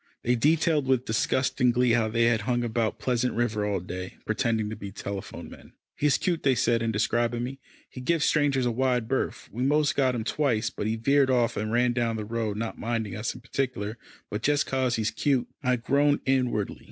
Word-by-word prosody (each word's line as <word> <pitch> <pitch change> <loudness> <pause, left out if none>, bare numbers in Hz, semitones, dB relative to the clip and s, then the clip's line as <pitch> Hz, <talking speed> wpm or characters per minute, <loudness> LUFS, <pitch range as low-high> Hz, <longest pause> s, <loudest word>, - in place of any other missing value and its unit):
They 120 +1 +2
detailed 150 +2 +2
with 130 -1 +2
disgusting 125 +3 +1
glee 125 0 +2
how 115 -1 +3
they 115 +2 +1
had 115 -2 +3
hung 120 +2 0
about 115 -2 -1
Pleasant 125 0 0
River 110 -3 0
all 100 -2 0
day, 90 +1 -7
pretending 110 -1 0
to - - -4
be 100 -2 -8
telephone 100 0 -6
men. - - -14 0.2
"He's 150 -1 +2
cute," 175 -3 -1
they 135 -2 +3
said 115 0 +2
in 115 -1 0
describing 120 +3 0
me. 135 +2 -5 0.3
"He 130 - -9
gives 165 +4 +1
strangers 140 -4 +2
a 120 - +1
wide 125 -1 0
berth. 135 +2 -2
We 120 - -5
most 150 +3 +2
got 130 -3 +2
him 115 - -2
twice, 115 -4 0
but 105 - -4
he 110 - 0
veered 140 +4 +3
off 120 -2 +2
and 110 +1 -2
ran 120 +1 +2
down 120 -2 0
the 105 -1 -4
road, 110 -2 -2
not 115 +1 -4
minding 115 -2 -2
us 110 +2 -3
in 125 - -11
particular, 120 -4 -3 0.3
but 105 - -3
just 145 +3 +2
'cause 130 -2 0
he's 110 -1 0
cute." 135 -4 +1
I 125 -2 +2
groaned 140 +4 +2
inwardly. 125 -6 0
120 Hz, 210 wpm, -27 LUFS, 110-130 Hz, 0.3 s, how